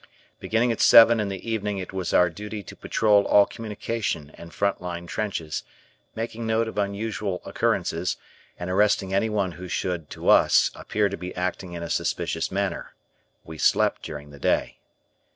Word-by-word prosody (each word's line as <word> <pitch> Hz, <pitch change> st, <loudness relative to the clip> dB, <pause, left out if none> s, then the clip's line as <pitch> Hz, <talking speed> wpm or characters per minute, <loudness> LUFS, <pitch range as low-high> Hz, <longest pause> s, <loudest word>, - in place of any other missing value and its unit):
Beginning 115 Hz, +2 st, +1 dB
at 115 Hz, -, -2 dB
seven 115 Hz, 0 st, +8 dB
in 105 Hz, -, 0 dB
the 95 Hz, +2 st, -6 dB
evening 105 Hz, -3 st, -2 dB
it 95 Hz, 0 st, -6 dB
was 95 Hz, -2 st, -3 dB
our 90 Hz, -, +5 dB
duty 105 Hz, +2 st, -7 dB
to -, -, -11 dB
patrol 105 Hz, -2 st, +3 dB
all 100 Hz, -1 st, +6 dB
communication 105 Hz, -8 st, -4 dB
and 85 Hz, 0 st, -12 dB
front 100 Hz, +1 st, -1 dB
line 85 Hz, -1 st, -5 dB
trenches, 85 Hz, -5 st, -3 dB, 0.5 s
making 115 Hz, 0 st, -4 dB
note 110 Hz, +1 st, +1 dB
of 110 Hz, -, -4 dB
unusual 100 Hz, -1 st, -2 dB
occurrences, 85 Hz, +2 st, -1 dB, 0.4 s
and 90 Hz, -, -5 dB
arresting 95 Hz, -1 st, +2 dB
anyone 100 Hz, -2 st, +1 dB
who 90 Hz, +2 st, -9 dB
should, 90 Hz, -3 st, -3 dB
to -, -, -7 dB
us, -, -, +5 dB
appear 105 Hz, -1 st, 0 dB
to 100 Hz, 0 st, -5 dB
be 90 Hz, 0 st, -7 dB
acting 90 Hz, 0 st, -3 dB
in 85 Hz, -1 st, -5 dB
a 85 Hz, -, -5 dB
suspicious -, -, -1 dB
manner. 100 Hz, -2 st, -3 dB, 0.5 s
We 80 Hz, -1 st, -10 dB
slept -, -, +2 dB
during 75 Hz, -1 st, -8 dB
the 70 Hz, -, -13 dB
day. -, -, 0 dB
100 Hz, 170 wpm, -25 LUFS, 90-105 Hz, 0.5 s, seven